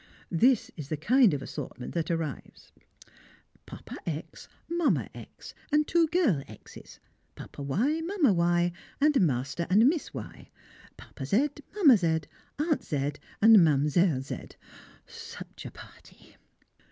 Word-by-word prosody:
This 235 +7 +3
is 150 -4 -8
the 155 - -2
kind 235 - +4
of 145 -2 -3
assortment 130 -3 -7
that 165 -2 -2
arrives: 165 -5 -5 1.0
Papa - - -9
X, 160 0 -6 0.2
Mamma 340 -2 0
X, - - -12 0.2
and 300 +1 +3
two 335 -1 +3
girl 305 - +2
X'es; 110 - -13 0.4
Papa - - -10
Y, 235 - 0
Mamma 330 - +2
Y, 175 0 +2 0.3
and 295 -3 +3
Master 140 +1 -1
and 215 +6 +5
Miss 315 +1 0
Y; - - -9 0.5
Papa 135 - -9
Z, 255 - +2 0.3
Mamma 300 - +6
Z, 165 -3 0 0.4
Aunt 305 +1 0
Z, 145 -1 -2 0.3
and 220 0 +9
Mdlle. 150 -2 +3
Z 135 - -8 0.5
such - - -10
a - - -10
party! - - -16
175 Hz, 130 wpm, -28 LUFS, -, 1.0 s, and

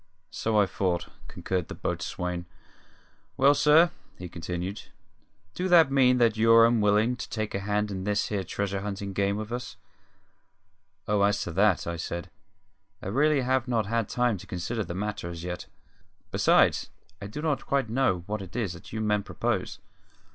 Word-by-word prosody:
"So 110 -1 0
I 100 - +5
thought," 90 -2 -2 0.2
concurred 90 -3 -3
the - - -7
boatswain. 90 0 -3 0.9
"Well, 140 +2 +6
sir," 150 +4 +5 0.3
he 90 -1 -7
continued, 90 +3 -5 0.7
"do 185 - -2
that 165 -6 +6
mean 130 -2 +4
that 115 -3 +3
you're 115 +1 +6
unwillin' 110 +1 +3
to - - -6
take 110 -2 -3
a 100 - -1
hand 105 +1 -1
in 95 -1 -4
this 105 0 0
here 100 -2 -1
treasure 100 +2 -3
huntin' 100 -1 -5
game 100 +1 0
with 110 +1 -6
us?" 125 +1 -5 1.3
"Oh, 105 -1 +2
as 100 +1 +2
to - - -5
that," 100 +2 +2
I 85 0 -3
said, 85 +2 -5 0.7
"I - - -6
really 145 +5 +3
have 130 0 0
not 115 -3 +1
had 115 +1 -1
time 120 -4 +1
to - - -12
consider 110 +6 -3
the 85 - -6
matter, 100 -2 -3
as 85 -1 -7
yet. 90 0 -5 0.6
Besides, - - +3 0.3
I 100 - -5
do 105 - -7
not 150 -5 -1
quite 140 -4 +1
know 115 -7 +1
what 105 +1 -3
it 95 0 -10
is 110 -8 -1
that 85 - -12
you 110 - -3
men 105 -1 +1
propose. - - -2
105 Hz, 175 wpm, -27 LUFS, 95-120 Hz, 1.3 s, Well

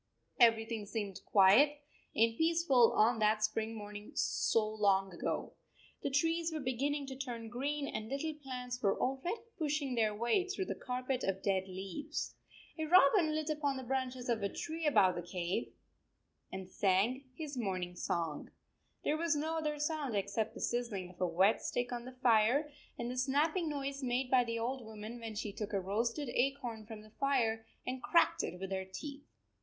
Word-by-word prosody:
Everything 225 -2 +4
seemed 205 -3 -4
quiet 225 +10 +6 0.4
and 225 0 +3
peaceful 320 -6 +4
on 225 +2 +4
that 215 0 +3
spring 220 +1 -1
morning 210 -1 -8
so 220 -2 +2
long 200 -3 +2
ago. 170 - -3 0.5
The - - -1
trees 325 +4 +1
were 315 - -3
beginning 280 +2 -1
to 270 -1 -6
turn 240 -4 -5
green 280 +4 -2
and 215 0 -4
little 295 +3 -2
plants 250 -4 -6
were 195 -2 +2
already 275 - -1 0.2
pushing 295 -3 0
their 220 -3 +1
way 235 - +1
through 380 0 -2
the - - -2
carpet 255 0 -3
of 195 0 -1
dead 190 -1 +1
leaves. 195 +12 -5 0.5
A 315 - 0
robin 315 -1 +5
lit 310 0 -1
upon 290 -3 0
the 260 - -5
branches 255 0 -2
of 230 -3 +1
a 200 - 0
tree 325 +5 -3
above 205 -10 +5
the 175 - -4
cave 175 +4 -3 0.8
and 190 -1 -6
sang 205 +8 +2
his 300 -2 -5
morning 185 -6 -2
song. 165 -3 -2 0.5
There 305 - +1
was 330 -1 +1
no 320 +2 -1
other 300 -1 -1
sound 295 -5 -1
except 205 +3 -1
the - - -8
sizzling 220 -7 -2
of 180 - -16
a 180 - +3
wet 190 +5 +3
stick 245 0 -2
on 240 -1 -4
the 255 - -8
fire, 245 +6 +4 0.3
and 240 +1 -3
the 250 - -5
snapping 305 +6 +1
noise 280 -1 -3
made 250 0 -1
by 250 -2 +5
the 230 0 -2
old 245 +3 -2
woman 220 +2 -8
when 225 -2 -6
she 205 -1 -3
took 210 0 -5
a 200 - +2
roasted 230 +9 -1
acorn 245 -4 -1
from 220 -2 -8
the 215 - -16
fire 230 -5 +1 0.2
and 255 0 -3
cracked 335 - +3
it 180 - -5
with 190 0 -5
her 190 0 -1
teeth. 285 +6 -7
245 Hz, 180 wpm, -34 LUFS, 210-285 Hz, 0.8 s, quiet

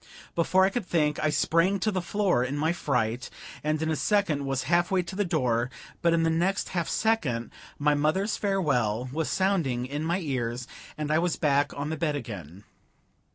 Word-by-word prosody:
Before 185 +3 +3
I 195 - +1
could 230 -5 -3
think, 150 -3 +1
I 155 - +2
sprang 170 +5 +2
to 215 - +1
the 185 -2 -1
floor 185 -8 +1
in 135 +3 -2
my 160 +3 +1
fright, 125 -6 -1 0.3
and 155 0 0
in 160 - 0
a - - +1
second 160 -8 +1
was 135 -1 -1
half 170 +5 +2
way 190 -2 +2
to 175 +2 -8
the 205 - +1
door; 125 - 0 0.3
but 170 - +3
in 165 0 +3
the 165 - +2
next 180 +5 0
half 170 -3 -2
second 145 - 0 0.3
my 150 +1 +3
mother's 155 +9 +1
farewell 130 - 0
was 160 +2 -1
sounding 165 -11 +1
in 145 +4 -4
my 170 +3 +1
ears, 125 -6 -3 0.3
and 150 0 -2
I 155 - +4
was 175 0 +1
back 145 -2 +2
on 145 +2 -3
the 160 - -2
bed 150 -2 0
again. 100 - -7
155 Hz, 200 wpm, -27 LUFS, 135-180 Hz, 0.3 s, I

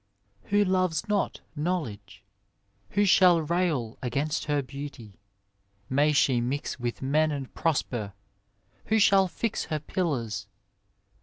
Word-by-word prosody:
Who 205 +1 +3
loves 185 0 +1
not 205 -1 -1
knowledge? 120 - -3 0.7
Who 205 +1 +3
shall 180 -2 +6
rail 155 -8 -1
Against 140 +5 -1
her 145 -2 0
beaaty? 135 -6 -9 0.7
May 145 +3 +3
she 130 -4 +3
mix 135 +3 -3
With 120 +1 -4
men 155 +4 +2
and 140 -3 -5
prosper! 120 -10 -1 0.7
Who 220 - +2
shall 195 -2 +5
fix 220 +4 -2
Her 155 - -2
pillars 140 - -2
150 Hz, 120 wpm, -27 LUFS, 125-180 Hz, 0.7 s, shall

